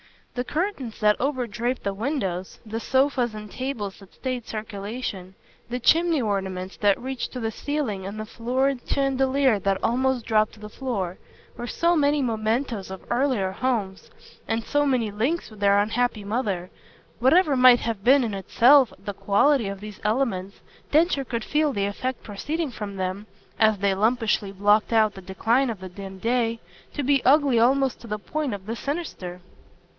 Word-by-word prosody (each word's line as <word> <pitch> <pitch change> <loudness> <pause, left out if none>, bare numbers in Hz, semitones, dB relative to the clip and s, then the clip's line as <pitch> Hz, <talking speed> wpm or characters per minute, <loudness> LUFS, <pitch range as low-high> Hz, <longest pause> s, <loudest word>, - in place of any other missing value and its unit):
The 245 - -2
curtains 300 - -3
that 210 0 +4
overdraped 250 -2 -2
the 200 - -1
windows, 195 - -3
the 220 +1 -4
sofas 260 -2 +1
and 210 -1 -8
tables 245 -7 -4
that 195 -2 -16
stayed 255 -3 -4
circulation, 205 -3 -5 0.3
the 245 +1 -2
chimney 330 +3 +3
ornaments 190 -3 -3
that 205 -1 +3
reached 260 0 -4
to 255 - -4
the 225 -2 -2
ceiling 225 -8 -3
and 205 +2 -6
the 215 - -4
florid 255 +4 0
chandelier 270 -3 +2
that 195 0 +1
almost 255 0 +1
dropped 215 -1 +2
to 215 - -15
the 210 0 -9
floor, 205 -8 -3 0.4
were 240 0 -6
so 340 +7 +2
many 290 -2 +2
mementoes 225 -2 -1
of 190 0 -8
earlier 240 -7 +1
homes 205 -4 -2 0.4
and 225 0 -1
so 290 +3 +1
many 240 -6 +1
links 245 +9 -1
with 215 - -13
their 200 0 +4
unhappy 220 +1 0
mother. 200 -5 -2 0.5
Whatever 290 +5 +4
might 250 -1 +7
have 225 -4 -3
been 270 +3 +6
in 225 -3 -2
itself 240 +6 +5
the 200 +1 -6
quality 220 +5 +2
of 195 0 -6
these 210 -1 -9
elements 210 -4 -1 0.3
Densher 305 -3 +3
could 235 -2 -3
feel 300 +1 +1
the 200 -1 0
effect 255 +5 -3
proceeding 295 +9 -3
from 210 -3 -6
them, 190 +2 -3 0.3
as 220 -2 +4
they 200 0 +1
lumpishly 215 -1 +1
blocked 205 +3 +3
out 215 -2 +4
the 190 - -10
decline 225 +8 +1
of 220 -4 -4
the 185 - -7
dim 195 +1 -9
day, 230 +2 0 0.3
to 290 - -2
be 275 0 +2
ugly 275 -3 +4
almost 265 +2 +3
to 235 - -10
the 210 -1 -2
point 270 - -3
of 190 -1 -11
the 225 +2 -4
sinister. 250 - -5
230 Hz, 170 wpm, -25 LUFS, 200-265 Hz, 0.5 s, might